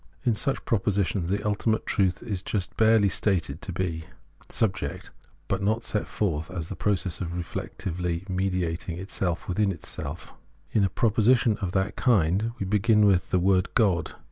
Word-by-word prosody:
In 120 - +3
such 135 +5 -1
propositions 100 -4 0
ultimate 110 +1 0
truth 95 -3 +1
is 105 -6 -3
just 95 -2 -3
barely 110 -2 +5
stated 90 -7 0
to - - -5
be 85 -3 -3 0.4
Subject, 100 -10 -2 0.4
but - - -1
not 110 +3 +1
set 105 - -2
forth 80 -6 -1
as 85 -3 -5
the 100 - -4
process 95 -4 -1
of 85 -1 -3
reflectively 90 0 -4
mediating 90 -3 -1
itself 90 -2 -3
within 100 +2 +1
itself. 80 -2 -7 0.4
In 105 - +3
a 95 - +3
proposition 115 +5 +3
of 95 -3 -3
that 95 +1 0
kind 105 -2 +2
we 100 - -3
begin 105 +2 +3
with 95 -3 +3
the 95 - +2
word 95 +1 +2
God. 100 -8 +2
95 Hz, 155 wpm, -26 LUFS, 90-105 Hz, 0.4 s, barely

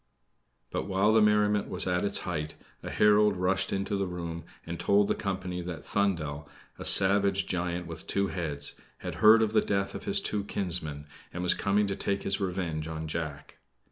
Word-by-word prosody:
But - - -2
while 100 +2 +3
the 110 - +5
merriment 105 -1 +3
was 90 +1 -1
at 90 -1 0
its 100 0 0
height, 75 -4 -4 0.3
a - - -6
herald 105 -1 +4
rushed 95 +1 0
into 100 +1 -1
the 100 -1 -1
room 85 -2 -5 0.2
and 85 0 -5
told 100 0 +3
the - - +2
company 90 -2 -3
that 85 -2 -6
Thundel, 80 -8 -1 0.3
a - - -6
savage 100 0 +4
giant 90 -1 -2
with 80 -1 -8
two 100 - +1
heads, 75 -5 -3 0.3
had - - -3
heard 110 +1 +8
of 110 0 -1
the - - +5
death 100 -1 -1
of - - -7
his 200 0 +1
two 105 - -1
kinsmen, 80 -7 -3 0.3
and 90 - -4
was 90 - +4
come 100 +1 +1
to 100 -1 -2
take 100 0 -1
his 95 +1 0
revenge 90 -5 -2
on 80 0 -5
Jack. 75 -3 -5
95 Hz, 190 wpm, -29 LUFS, 85-100 Hz, 0.3 s, heard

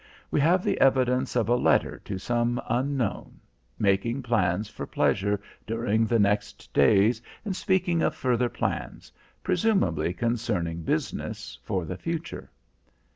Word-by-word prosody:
We - - +2
have 175 +5 +3
the - - 0
evidence 130 -1 +3
of 115 -4 +2
a 120 - +3
letter - - +2
to 100 - -4
some 120 +4 0
unknown, 130 -3 -2 0.4
making 110 +6 +1
plans 110 -4 +1
for 105 - -7
pleasure 100 +1 +1 0.3
during 115 0 +1
the 115 - +2
next 105 0 0
days, 105 - +4 0.2
and 195 -3 -2
speaking 180 -3 +1
of - - +1
further 125 -1 +1
plans, - - -4 0.3
presumably 175 - +1
concerning 90 -8 -1
business, 80 - -3
for 90 -3 -2
the 90 +2 -5
future. 165 - -5
120 Hz, 130 wpm, -26 LUFS, 100-130 Hz, 0.4 s, days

